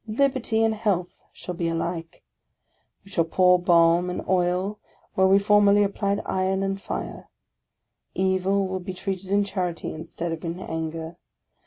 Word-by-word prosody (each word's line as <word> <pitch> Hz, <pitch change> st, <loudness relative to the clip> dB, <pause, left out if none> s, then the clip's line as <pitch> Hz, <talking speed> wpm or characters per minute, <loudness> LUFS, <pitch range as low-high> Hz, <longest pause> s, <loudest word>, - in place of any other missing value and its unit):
Liberty 245 Hz, -1 st, +1 dB
and 225 Hz, 0 st, +2 dB
health 205 Hz, -5 st, -2 dB
shall 180 Hz, -, -7 dB
be 170 Hz, -1 st, -2 dB
alike. 165 Hz, 0 st, -4 dB, 0.8 s
We 195 Hz, -, -15 dB
shall 170 Hz, -3 st, +2 dB
pour 180 Hz, +2 st, +4 dB
balm 170 Hz, 0 st, +4 dB
and 180 Hz, -, -5 dB
oil 185 Hz, +3 st, 0 dB, 0.3 s
where 190 Hz, 0 st, +4 dB
we 195 Hz, +1 st, +6 dB
formerly 205 Hz, 0 st, +5 dB
applied 200 Hz, 0 st, -1 dB
iron 190 Hz, +1 st, 0 dB
and 195 Hz, 0 st, -2 dB
fire; -, -, -6 dB, 0.9 s
evil 190 Hz, +1 st, +1 dB
will 185 Hz, 0 st, -3 dB
be 185 Hz, 0 st, -7 dB
treated 190 Hz, 0 st, -4 dB
in 200 Hz, +1 st, +3 dB
charity, 180 Hz, -4 st, -3 dB
instead 165 Hz, +1 st, -5 dB
of 165 Hz, -1 st, -5 dB
in 170 Hz, +1 st, -4 dB
anger. 160 Hz, 0 st, -5 dB
185 Hz, 150 wpm, -25 LUFS, 170-200 Hz, 0.9 s, we